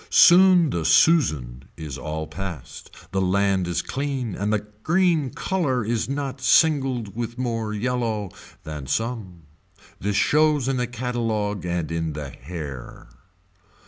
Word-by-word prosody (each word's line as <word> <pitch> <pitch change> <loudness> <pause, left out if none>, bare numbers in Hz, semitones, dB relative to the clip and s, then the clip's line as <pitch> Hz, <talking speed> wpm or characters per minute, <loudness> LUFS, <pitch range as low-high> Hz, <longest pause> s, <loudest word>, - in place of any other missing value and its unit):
Soon 180 -3 +6
the 85 - -2
Susan 80 - +3
is 75 -4 -6
all 80 +2 -4
past, 85 -5 -8 0.2
the 95 - 0
land 95 0 +1
is 85 -2 -1
clean 135 -5 -3
and 100 +3 -2
the 105 -1 0 0.2
green 170 -2 +2
color 135 - -1
is 115 +2 -1
not 140 -1 -4
singled 130 -7 +2
with 120 0 -4
more 115 -4 -2
yellow 110 -2 -2 0.3
than 75 -3 -7
some. 110 - -3 0.6
This 100 +1 -2
shows 150 +1 +3
in 135 -1 0
the 125 -1 -1
catalogue 115 -5 -2
and 85 -2 -2
in 80 -1 -2
the 75 -2 -6
hair. 70 -5 -8
110 Hz, 135 wpm, -23 LUFS, 85-130 Hz, 0.6 s, Soon